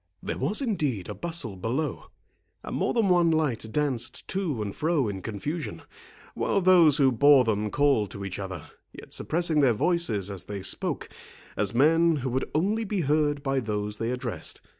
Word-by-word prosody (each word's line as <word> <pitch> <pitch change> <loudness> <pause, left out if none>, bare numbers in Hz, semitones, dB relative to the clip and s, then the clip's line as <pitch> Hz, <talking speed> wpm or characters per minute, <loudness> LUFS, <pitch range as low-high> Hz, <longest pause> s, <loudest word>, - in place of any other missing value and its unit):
There - - -4
was 180 - 0
indeed 150 - -2
a - - -3
bustle 165 - -3
below, 120 +11 -3 0.6
and - - -5
more - - 0
than 230 -4 +2
one 175 -2 +4
light 140 -9 0
danced 130 -2 -2
to 180 - -2
and 100 -1 -5
fro 155 -5 +1
in 95 -2 -4
confusion, 110 - -5 0.5
while - - 0
those 175 -6 +6
who 135 -3 +4
bore 140 +2 +6
them 105 -2 0
called 140 -6 +2
to 100 +1 -7
each 95 -1 -5
other, 95 -5 -7 0.2
yet - - -11
suppressing 165 -1 0
their 135 -5 +4
voices 110 - 0
as 95 -3 -6
they 100 -2 -6
spoke, - - -1 0.5
as 105 +2 0
men 165 +5 +4
who 130 -3 -3
would 130 +2 -2
only 205 +8 +1
be 200 -3 -2
heard 145 -1 +1
by 135 -1 0
those 105 -3 -3
they 115 +1 -2
addressed. 125 -2 -4
135 Hz, 180 wpm, -26 LUFS, 110-165 Hz, 0.6 s, those